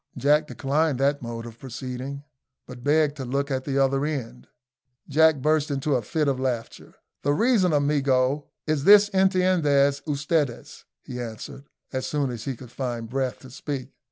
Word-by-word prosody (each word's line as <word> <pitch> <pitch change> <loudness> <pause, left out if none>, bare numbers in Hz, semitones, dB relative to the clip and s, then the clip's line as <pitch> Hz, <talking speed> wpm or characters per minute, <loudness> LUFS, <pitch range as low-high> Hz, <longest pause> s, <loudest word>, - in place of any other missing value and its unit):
Jack 150 +4 +3
declined 145 0 0
that 140 +1 +1
mode 115 -1 -6
of 115 -1 -11
proceeding, 130 +2 -6 0.4
but 125 -1 -11
begged 150 0 +2
to 135 - -4
look 140 +3 -2
at 130 -1 -2
the 140 -1 -1
other 135 0 +2
end. 125 -5 -4 0.6
Jack 160 +2 +5
burst 155 -1 +2
into 140 +1 -1
a 125 - +2
fit 150 +7 -1
of 135 -2 0
laughter. 125 -3 -4 0.3
"The 145 - +1
reason, 210 - +3
amigo, 140 -1 +1 0.2
is 155 -3 0
this 205 0 +8
intendez 180 -8 +3
ustedes," 145 -3 -2 0.2
he 125 -1 -6
answered, 120 +4 -8 0.2
as 130 0 -2
soon 145 -3 -1
as 120 -2 -7
he 135 - -3
could 120 0 -13
find 120 -4 -4
breath 130 -1 -2
to 130 - -12
speak. 135 -1 -5
140 Hz, 165 wpm, -25 LUFS, 130-150 Hz, 0.6 s, this